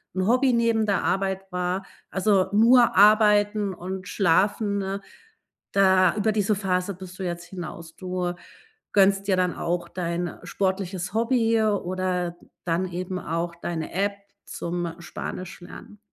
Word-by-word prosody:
'n 185 0 0
Hobby 255 +2 +3
neben 230 -2 +2
der 200 -2 +1
Arbeit 190 0 -1
wahr, 180 +1 -1 0.3
also 190 -1 +2
nur 235 +3 +5
arbeiten 210 -1 +5
und 185 +1 -6
schlafen, 200 +3 +2
ne? 195 0 -3 0.7
Da 190 -2 +4
über 215 +1 +1
diese 210 0 +1
Phase 190 0 -1
bist 185 0 -11
du - - -3
jetzt 175 -1 -4
hinaus. 170 -2 -8
Du 180 -1 -3 0.6
gönnst 195 0 +4
ja 190 - +4
dann 180 -1 0
auch 175 0 -2
dein 175 -1 -3
sportliches 190 -1 -2
Hobby 230 -1 +2
oder 185 -4 -1 0.3
dann 175 +2 0
eben 185 +1 -4
auch 170 +1 -3
deine 170 -2 -5
App 200 +2 0 0.3
zum 170 -1 -4
Spanisch 180 +1 -7
lernen. 205 +3 -12
190 Hz, 140 wpm, -25 LUFS, 180-205 Hz, 0.7 s, nur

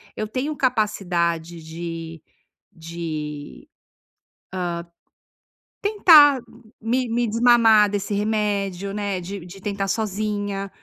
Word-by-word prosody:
eu 215 - -3
tenho 265 +7 -3
capacidade 175 -9 -1
de 165 0 -7 0.5
de, 160 -3 -7
ah, - - -62 2.2
tentar 305 - +7 0.4
me 245 +3 0
me 235 +1 0
desmamar 225 -2 +5
desse 205 0 -3
remédio, 200 -2 -1
né? 200 -3 -3
De 185 0 -7
de 185 +2 -12
tentar 200 -1 -3
sozinha. 205 -1 -2
200 Hz, 95 wpm, -22 LUFS, 170-220 Hz, 2.2 s, tentar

